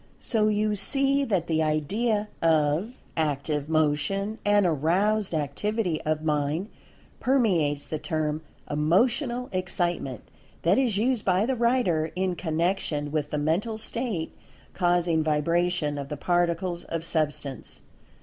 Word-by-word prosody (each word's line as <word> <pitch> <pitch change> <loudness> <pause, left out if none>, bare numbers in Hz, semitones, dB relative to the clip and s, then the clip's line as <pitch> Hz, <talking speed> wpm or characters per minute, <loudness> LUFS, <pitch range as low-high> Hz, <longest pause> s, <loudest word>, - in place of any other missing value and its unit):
So 215 -3 +1
you 210 0 +1
see 275 +6 +2
that 190 -9 0
the 160 -2 +1
idea 205 +9 0
of 160 - +2 0.2
Active 150 -1 -1
Motion, 160 +8 0
and 205 -1 +4
Aroused 180 +7 +1
Activity, 180 +3 -1
of 155 0 -1
Mind, 150 +5 0 0.5
permeates 180 - +1
the 155 - -3
term 155 -2 -2 0.3
"Emotional 240 - +1
Excitement," 175 - -1 0.4
that 180 +8 +4
is 240 -7 +1
used 240 +1 +1
by 185 +2 +2
the 260 +2 0
writer 230 -10 +1
in 185 -1 0
connection 165 -3 -1
with 150 -1 -1
the 150 - -2
Mental 170 +10 0
State 220 -6 -3 0.4
causing 175 -3 +2
vibration 155 0 +1
of 140 -1 -6
the 150 - -4
Particles 175 +1 0
of 165 0 -4
Substance. 150 -5 -2
175 Hz, 125 wpm, -26 LUFS, 155-210 Hz, 0.5 s, and